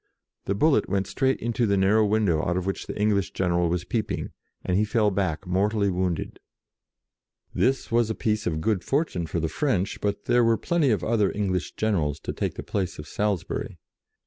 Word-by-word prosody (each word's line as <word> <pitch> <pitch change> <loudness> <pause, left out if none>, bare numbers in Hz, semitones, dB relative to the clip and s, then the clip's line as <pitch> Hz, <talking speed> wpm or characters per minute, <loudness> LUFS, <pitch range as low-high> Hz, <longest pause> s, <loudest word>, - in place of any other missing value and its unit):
The 100 - 0
bullet 150 +8 +3
went 100 -1 0
straight 130 +6 0
into 120 0 0
the 100 -1 +2
narrow 100 +3 +4
window 100 -7 +2
out 85 +1 0
of 90 - -2
which 95 - -3
the - - -6
English 105 -2 +1
general 85 -2 +1
was 90 +1 -1
peeping, 110 +1 -3 0.3
and 90 - 0
he 105 - +3
fell 105 -1 +2
back, 95 -3 -1
mortally 100 +2 +1
wounded. 90 -2 -2 1.1
This 135 -1 +1
was 115 -1 +3
a 110 - -1
piece 110 -1 -1
of 80 -2 -1
good 100 -1 0
fortune 135 - -1
for 85 - -2
the 80 - 0
French, 100 - -1
but 100 0 -2
there 120 0 +4
were 115 -1 +3
plenty 170 -5 +1
of 110 - +1
other 110 -3 +2
English 95 -4 -2
generals 80 -9 0
to - - -4
take - - -2
the - - -6
place 95 -3 -3
of 75 - -8
Salisbury. 100 -1 -2
100 Hz, 195 wpm, -25 LUFS, 90-110 Hz, 1.1 s, narrow